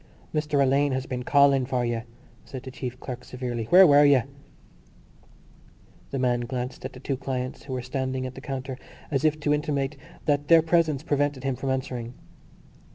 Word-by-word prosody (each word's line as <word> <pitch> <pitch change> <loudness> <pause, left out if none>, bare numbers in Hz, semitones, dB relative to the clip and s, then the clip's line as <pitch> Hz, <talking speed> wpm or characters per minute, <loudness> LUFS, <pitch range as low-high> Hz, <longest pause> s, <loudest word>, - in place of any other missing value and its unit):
"Mr 150 -2 0
Alleyne 140 +1 +3
has 130 0 -2
been 125 -1 -4
calling 140 0 +4
for 125 -1 -1
you," 120 -1 -1 0.4
said 130 -2 -8
the 130 - -8
chief 125 -1 -6
clerk 125 -2 -7
severely. 125 -3 -4
"Where 185 - +8
were 145 -2 +7
you?" 140 -4 +5 1.9
The 135 - -3
man 125 -2 +1
glanced 125 +1 -5
at - - -6
the 125 - -11
two 135 +1 -2
clients 130 -1 -4
who 135 - -5
were 125 -1 -3
standing 130 0 -2
at 130 - -5
the 130 - -10
counter 135 -2 -5 0.3
as 140 0 0
if 155 0 +2
to 145 0 +2
intimate 150 -1 -1 0.3
that 145 -1 +1
their 165 -1 +7
presence 160 -4 +2
prevented 145 -3 0
him 135 -1 -1
from 135 +2 -4
answering. 125 -2 -3
135 Hz, 180 wpm, -26 LUFS, 125-145 Hz, 1.9 s, Where